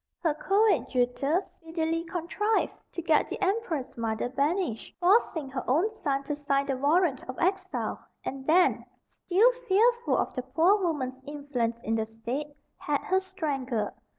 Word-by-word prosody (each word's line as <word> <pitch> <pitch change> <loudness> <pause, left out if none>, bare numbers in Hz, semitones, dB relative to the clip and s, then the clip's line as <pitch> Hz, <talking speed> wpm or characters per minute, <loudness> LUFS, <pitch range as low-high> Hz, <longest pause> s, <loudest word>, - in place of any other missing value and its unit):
Her 320 -3 +3
coadjutor 305 - +2
speedily 325 -1 -3
contrived 360 +6 0 0.2
to 345 - -5
get 315 -2 +3
the - - -5
empress 375 - -1
mother 225 0 -2
banished, 280 - -1
forcing 355 - +3
her 265 -1 -4
own 335 - +3
son 275 -9 -2
to 295 +1 -3
sign 280 -1 0
the 275 -1 -1
warrant 290 +1 +2
of 255 - -5
exile; 365 - -1 0.2
and 270 0 -4
then, 355 +3 +4 0.4
still 415 +8 +5 0.2
fearful 475 +5 +3
of - - -1
the 255 - -2
poor 320 +11 +3
woman's 265 -7 -2
influence 275 -6 -2
in 225 - -2
the 220 -1 0
state, 235 +6 -4 0.3
had 290 -1 -1
her 375 0 +2
strangled. 285 - -2
300 Hz, 150 wpm, -28 LUFS, 260-370 Hz, 0.4 s, still